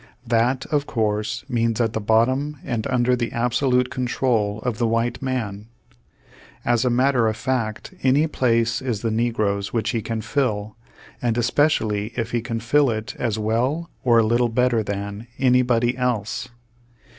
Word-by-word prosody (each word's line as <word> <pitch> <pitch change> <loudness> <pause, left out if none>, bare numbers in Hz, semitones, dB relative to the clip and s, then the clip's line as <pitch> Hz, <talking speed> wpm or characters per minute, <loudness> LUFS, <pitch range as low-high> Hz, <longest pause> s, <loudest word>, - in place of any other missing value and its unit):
That, 120 +2 +1
of 145 -2 +1
course, 110 0 -1
means 115 -3 0
at 115 -2 +1
the 110 - -1
bottom 130 +8 +2
and 115 -3 -2
under 125 0 +2
the 120 -2 -2
absolute 125 +1 +1
control 120 -5 0
of 120 -3 -3
the 120 - +2
v/hite 115 +2 0
m.an. 110 -6 -3 1.0
As 120 0 +2
a 125 - +2
matter 125 -1 +3
of 110 -1 -1
fact, 115 -5 -2
any 135 +4 +3
place 115 -5 +1
is 120 -5 -2
the 115 - 0
negro's 110 -3 0
which 115 -2 0
he 115 -3 -1
can 110 +1 -3
fill, 110 -5 -1 0.5
and 120 -1 0
especially 115 -4 +1
if 115 -1 -3
he 120 - 0
can 115 -1 -3
fill 135 +5 +3
it 110 -1 -4
as 115 -3 -1
well 125 +10 -1
or 120 -2 +4
a 115 - +5
little 120 +2 +2
better 125 0 +2
than 100 +2 -5
anybody 125 -2 +3
else. 120 -2 -2
120 Hz, 160 wpm, -22 LUFS, 110-125 Hz, 1.0 s, a